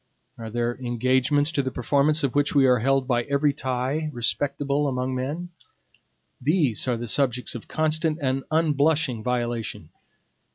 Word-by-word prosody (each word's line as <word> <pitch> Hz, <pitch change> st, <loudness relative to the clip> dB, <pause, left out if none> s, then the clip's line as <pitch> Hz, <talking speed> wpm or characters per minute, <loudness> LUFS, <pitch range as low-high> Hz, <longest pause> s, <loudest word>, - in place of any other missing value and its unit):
Are 115 Hz, -1 st, -7 dB
there 120 Hz, +2 st, -2 dB
engagements 130 Hz, +4 st, +1 dB
to 145 Hz, -, +1 dB
the 130 Hz, -, -2 dB
performance 145 Hz, +4 st, +1 dB
of 135 Hz, -, 0 dB
which 145 Hz, 0 st, +1 dB
we 140 Hz, -2 st, +5 dB
are 125 Hz, -2 st, +4 dB
held 135 Hz, +2 st, +1 dB
by 120 Hz, -2 st, +2 dB
every 140 Hz, +1 st, +1 dB
tie 130 Hz, +5 st, -2 dB
respectable 140 Hz, +3 st, 0 dB
among 130 Hz, -1 st, -2 dB
men? 145 Hz, +8 st, -4 dB, 0.9 s
These 140 Hz, -, +1 dB
are 125 Hz, -2 st, +1 dB
the 120 Hz, +1 st, -5 dB
subjects 125 Hz, 0 st, 0 dB
of 120 Hz, -, -8 dB
constant 155 Hz, 0 st, 0 dB
and 135 Hz, -2 st, -1 dB
unblushing 155 Hz, -5 st, +1 dB
violation. 120 Hz, -2 st, -3 dB
135 Hz, 150 wpm, -24 LUFS, 125-145 Hz, 0.9 s, we